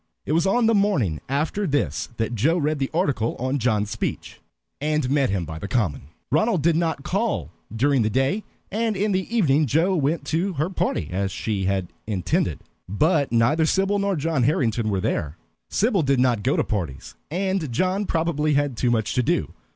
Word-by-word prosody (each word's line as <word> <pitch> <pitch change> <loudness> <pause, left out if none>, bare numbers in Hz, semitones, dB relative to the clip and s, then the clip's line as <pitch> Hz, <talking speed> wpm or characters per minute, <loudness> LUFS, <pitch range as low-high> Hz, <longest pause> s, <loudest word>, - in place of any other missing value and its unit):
It - - -3
was 165 +3 +2
on 230 +5 +3
the 225 - +4
morning 150 - +1
after 155 +9 -1
this 145 -1 -1
that 115 +1 -1
Joe 145 - +2
read 155 -2 0
the 135 - -1
article 145 -9 0
on 130 +3 -1
John's 110 -3 0
speech, - - -4 0.4
and 150 -3 0
met 140 -2 +2
him 95 -3 -1
by 80 0 -7
the 100 - -5
Common. 95 - -1 0.2
Ronald 160 - +2
did 170 0 +3
not 160 -4 0
call 185 - -1 0.2
during 135 +4 +2
the 110 - +1
day, 135 - 0 0.3
and 220 0 0
in 205 +2 +1
the 190 +2 -1
evening 150 -6 +3
Joe 165 +8 +2
went 150 -1 0
to 175 +6 0
her 155 +4 -1
party 80 - -1
as 95 +1 -1
she 100 -1 -2
had 95 -2 -1 0.2
intended; 100 -5 -1 0.3
but 150 - +2
neither 140 +8 +3
Sybil 195 +4 +1
nor 200 -1 0
John 160 -2 0
Harrington 120 -4 +1
were 95 -2 0
there. 75 -2 -2 0.3
Sybil 210 -3 +2
did 140 -3 +2
not 125 -4 +2
go 130 +6 +1
to - - +3
parties, 85 - -4 0.2
and 185 -3 -1
John 185 - 0
probably 155 -2 +1
had 145 -4 0
too 125 - +1
much 110 -3 0
to 125 - +2
do. - - 0
145 Hz, 190 wpm, -23 LUFS, 115-175 Hz, 0.4 s, the